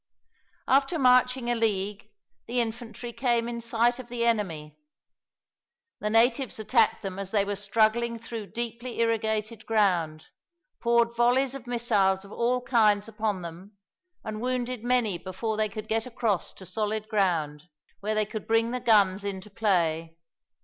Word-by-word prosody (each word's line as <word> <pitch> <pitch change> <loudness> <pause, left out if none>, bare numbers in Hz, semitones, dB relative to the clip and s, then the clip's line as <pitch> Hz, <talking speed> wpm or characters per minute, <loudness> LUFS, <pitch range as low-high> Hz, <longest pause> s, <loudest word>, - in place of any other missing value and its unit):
After 275 +5 +3
marching 250 -2 +3
a - - +3
league, 210 -3 -1 0.4
the 245 +1 0
infantry 235 0 -4
came 235 -1 +1
in 235 -1 -4
sight 235 +1 +1
of 255 - -8
the 235 -1 -1
enemy. 165 -10 -1 1.2
The 210 - -2
natives 235 +3 +2
attacked 220 0 +2
them 195 -1 -5
as 195 -1 -4
they 200 -1 +2
were 205 0 -2
struggling 220 +3 +1
through 225 -2 -7
deeply 235 +2 -5
irrigated 220 -1 0
ground, 180 -8 +1 0.5
poured 235 0 +2
volleys 250 +3 +3
of 265 -3 -9
missiles 205 -6 +1
of 195 - -14
all 245 +2 0
kinds 210 -4 +3
upon 215 -4 -2
them, 180 +5 -10 0.5
and 215 -1 -5
wounded 250 -1 -2
many 240 -7 +1
before 195 +4 -3
they 215 0 0
could 215 +1 -7
get 225 +2 -1
across 230 -6 -1
to 190 - -12
solid 215 +3 -2
ground, 165 -8 0 0.3
where 215 +2 -2
they 215 0 +2
could 215 0 -7
bring 225 +1 +2
the 250 - -2
guns 200 -4 +3
into 200 0 -5
play. 165 -6 0
220 Hz, 150 wpm, -27 LUFS, 200-235 Hz, 1.2 s, After